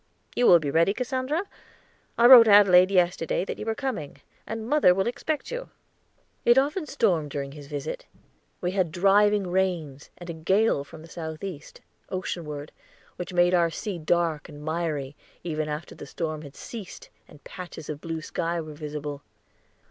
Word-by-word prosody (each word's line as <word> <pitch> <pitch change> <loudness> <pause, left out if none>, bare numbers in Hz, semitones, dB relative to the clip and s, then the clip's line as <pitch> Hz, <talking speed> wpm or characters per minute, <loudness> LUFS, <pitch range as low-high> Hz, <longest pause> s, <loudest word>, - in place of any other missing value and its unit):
You 245 - +3
will 175 - +9
be 150 -4 -3
ready, 170 +6 +3
Cassandra? 260 +6 -1 0.7
I 235 - +4
wrote 240 -2 +10
Adelaide 195 -3 +7
yesterday 180 -2 +1
that - - -6
you 215 - -6
were 225 - 0
coming, 220 - -4 0.3
and 225 0 -5
mother 275 -11 +4
will 190 0 +1
expect 295 +5 -3
you." - - -5 0.7
It 240 +1 +5
often 300 +5 +1
stormed 170 - +1
during 140 -1 -4
his 145 -1 -11
visit. 150 - -5 0.5
We 180 - -1
had 185 -4 0
driving 200 +3 +3
rains, 170 -7 -1
and 175 - -10
a 170 - -4
gale 190 0 +1
from 155 +2 -13
the - - -12
southeast, 160 0 -7 0.3
oceanward, 155 -5 -5 0.5
which 180 - -5
made 175 0 +3
our 170 -2 +4
sea 180 +2 -5
dark 165 0 0
and 150 -1 -11
miry, 155 -4 -2 0.3
even 155 -2 -3
after 150 +2 -5
the - - -10
storm 155 -2 -4
had 145 -2 -12
ceased 215 -6 -9 0.2
and 145 - -17
patches 175 -4 -9
of 150 -1 -6
blue 165 -1 -4
sky 170 +2 -2
were 155 -2 -7
visible. 150 -1 -6
175 Hz, 165 wpm, -26 LUFS, 155-205 Hz, 0.7 s, wrote